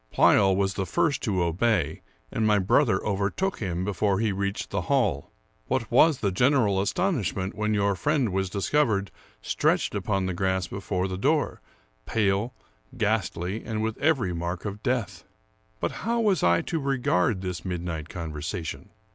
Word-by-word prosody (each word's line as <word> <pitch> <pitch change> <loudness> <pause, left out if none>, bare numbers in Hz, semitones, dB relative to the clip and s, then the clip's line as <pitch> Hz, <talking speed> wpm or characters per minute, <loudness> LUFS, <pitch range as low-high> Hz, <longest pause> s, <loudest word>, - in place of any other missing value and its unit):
Pleyel 95 -2 +5
was 95 0 +1
the 95 -1 -3
first 165 -4 +1
to 95 -7 0
obey, 90 0 0 0.3
and 115 - -1
my 105 -1 +4
brother 100 +2 +2
overtook 105 - -1
him 90 -3 -2
before 100 0 0
he 110 -2 +1
reached 100 +1 -3
the - - -1
hall. - - +1 0.4
What 125 -3 -1
was 145 +4 +5
the 100 - +1
general 110 -3 +3
astonishment 100 - -1
when 105 +1 0
your 100 -1 +2
friend 120 - 0
was 95 -1 0
discovered 100 0 +1 0.3
stretched - - +1
upon 95 -1 -1
the 95 - -1
grass 95 0 0
before 95 0 -2
the 95 -1 -5
door, 150 +6 +1 0.5
pale, 105 +3 0 0.4
ghastly, 105 -3 -1
and 110 -2 -3
with 110 0 -1
every 135 - +2
mark 85 +2 -4
of 105 0 -5
death! 125 -4 -2 0.6
But - - -1
how 235 +3 0
was 210 -5 +2
I 85 0 +3
to 165 - -2
regard 120 -8 +1
this 90 -3 -4
midnight 85 -4 -4
conversation? 80 +1 -5
100 Hz, 155 wpm, -26 LUFS, 95-120 Hz, 0.6 s, Pleyel